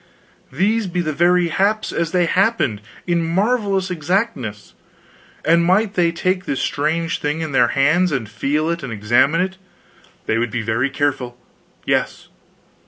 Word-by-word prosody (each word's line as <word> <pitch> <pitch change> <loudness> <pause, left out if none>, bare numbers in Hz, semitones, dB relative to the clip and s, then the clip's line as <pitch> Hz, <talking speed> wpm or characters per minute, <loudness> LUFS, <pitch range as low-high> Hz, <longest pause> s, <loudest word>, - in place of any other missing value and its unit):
"These 205 +9 +1
be 180 0 -2
the 155 -2 -2
very 175 +2 +3
haps 210 +5 0
as 165 -1 -1
they 180 -1 +2
happened, 185 - +1 0.2
in 170 -1 +1
marvelous 195 +1 0
exactness!" 160 - -2 0.7
And 170 +2 +4
might 195 +4 +2
they 175 -4 +2
take 185 +2 -1
this 135 - -2
strange 160 +3 -1
thing 150 +2 -2
in 160 -2 -3
their 125 -3 +4
hands, 165 +6 +3
and 130 -6 -2
feel 145 +10 -1
of 170 - -2
it - - -12
and 130 - -5
examine 120 - +2
it? 190 +1 -3 0.7
they 110 - 0
would 120 0 -1
be 115 0 -3
very 115 +5 0
careful. 135 -4 -2 0.5
Yes. - - -1
165 Hz, 160 wpm, -20 LUFS, 135-185 Hz, 0.7 s, And